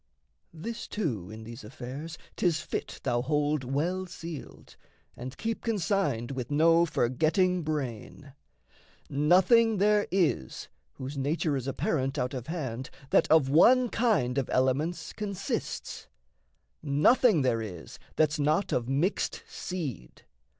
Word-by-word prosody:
This, 210 +8 -6
too, 120 - -3
in 110 +1 -9
these 115 +2 -9
affairs 135 +8 -7 0.2
'Tis 170 -4 +1
fit - - -5
thou 120 0 +1
hold 150 +1 0
well 170 +9 -1
sealed, 165 -3 -9 0.4
and 125 +2 -8
keep 225 +1 -3
consigned 190 - 0
With 125 -3 -4
no 165 +3 +4
forgetting 165 +8 +1
brain: 145 -2 -5 0.8
nothing 185 - +4
there 210 +1 +3
is 175 - 0 0.2
Whose 135 +2 -6
nature 150 +2 0
is 135 -1 -3
apparent 135 +1 -1
out 125 -1 -1
of 125 -2 -5
hand 130 -7 -4 0.2
That - - +4
of 155 -4 +5
one 245 - +6
kind 200 - +1
of 130 - -3
elements 135 +7 0
consists 200 -3 -4 0.7
Nothing 155 - +4
there 115 -3 +1
is 90 -7 -8 0.2
that's 150 -1 +2
not 155 +6 +1
of 120 0 -1
mixed 150 +9 0
seed. 145 - -6
150 Hz, 125 wpm, -29 LUFS, 130-180 Hz, 0.8 s, one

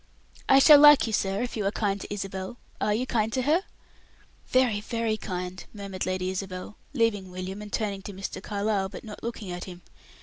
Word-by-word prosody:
"I 270 - +8
shall 290 +2 +9
like 295 -1 +8
you, 225 - -3
sir, 195 +2 0
if 245 - -4
you 215 - -2
are - - +1
kind 200 -2 -1
to - - -8
Isabel. 195 +1 -5 0.2
Are 210 - +2
you 225 +5 0
kind 225 -3 0
to 255 - 0
her?" 315 +7 +3 0.9
"Very, 250 -5 +2
very 230 0 -1
kind," 180 -3 -5
murmured 195 -3 -4
Lady 185 0 -1
Isabel, 190 +1 -5 0.2
leaving 215 -6 +1
William, 185 +2 -6
and 210 -1 -9
turning 200 -3 -2
to 200 - -8
Mr. 190 0 -6
Carlyle, 200 -1 -1
but 195 - -9
not 210 -2 -9
looking 225 -5 -5
at 175 0 -5
him. 180 -2 -10
205 Hz, 200 wpm, -27 LUFS, 190-230 Hz, 0.9 s, shall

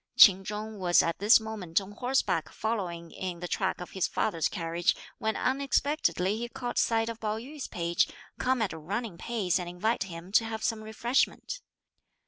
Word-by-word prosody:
Ch'in 195 -3 +9
Chung 210 +1 -5
was 175 -2 +5
at 165 - -1
this 210 +5 +7
moment 210 -7 -1
on 195 0 -9
horseback 205 - 0
following 180 -7 -3
in 180 -2 -5
the 175 - -4
track 190 +2 -1
of 180 - -7
his 190 - 0
father's 165 -7 0
carriage, 170 -1 0 0.2
when 220 -2 0
unexpectedly 260 - +1
he 240 0 -4
caught 245 0 -3
sight 225 -1 +2
of 230 -1 -5
Pao 215 -1 -1
yü's 275 +5 -7
page, 170 0 +1 0.3
come 255 -2 +2
at 200 - -2
a 160 - -7
running 195 +3 -4
pace 205 -6 0
and 175 -1 -4
invite 195 +5 0
him 175 0 -9
to 220 - +5
have 220 -1 -4
some 220 -2 -1
refreshment. 235 - 0
210 Hz, 180 wpm, -29 LUFS, 175-230 Hz, 0.3 s, Ch'in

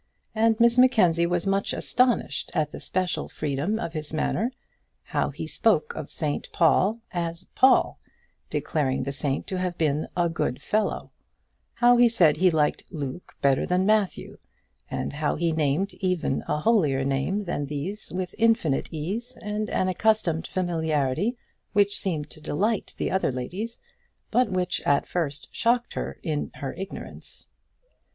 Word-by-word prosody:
And 225 0 +2
Miss 235 +1 +5
Mackenzie 180 -10 +5
was 175 0 0
much 195 0 0
astonished 245 - +1
at 150 -1 +1
the - - -7
special 185 -1 -1
freedom 150 +8 -1
of 170 -6 -4
his 155 -2 -4
manner, 215 +9 0 0.5
how - - -1
he - - -6
spoke 465 +1 +1
of - - -6
St 150 -4 -2
Paul 190 +7 +3
as 170 0 -3
Paul, 260 0 +4 0.5
declaring 135 -5 0
the 140 - -3
saint 140 0 -2
to 185 - -3
have 180 -1 -2
been 155 -1 +1
a 175 -1 +3
good 155 -6 -2
fellow; 215 0 -1 0.6
how 245 0 +5
he 240 0 +6
said 175 -10 +4
he 185 0 +5
liked 155 -3 +1
Luke 145 0 -6
better 135 -1 +3
than 180 +1 +2
Matthew, 210 -2 0 0.5
and - - -3
how 150 +1 0
he 170 +1 +1
named 160 +5 0
even 180 -7 -1
a - - 0
holier 150 -11 +3
name 140 +10 0
than 170 -6 -2
these 150 +8 -5
with 180 +1 -3
infinite 225 - +2
ease 215 +11 -4
and 210 0 -3
an 185 - +1
accustomed 185 -4 +1
familiarity 160 - 0 0.4
which 205 -1 +3
seemed 160 -6 -2
to 155 - -9
delight 200 +8 -1
the - - -1
other 190 -6 +1
ladies; 185 - -5 0.5
but 250 -2 +3
which 180 -1 -1
at 140 -1 +2
first 150 -5 -3
shocked 240 +1 +1
her - - -4
in 155 -4 -2
her 135 - -5
ignorance. 195 +2 -8
180 Hz, 155 wpm, -26 LUFS, 150-210 Hz, 0.6 s, he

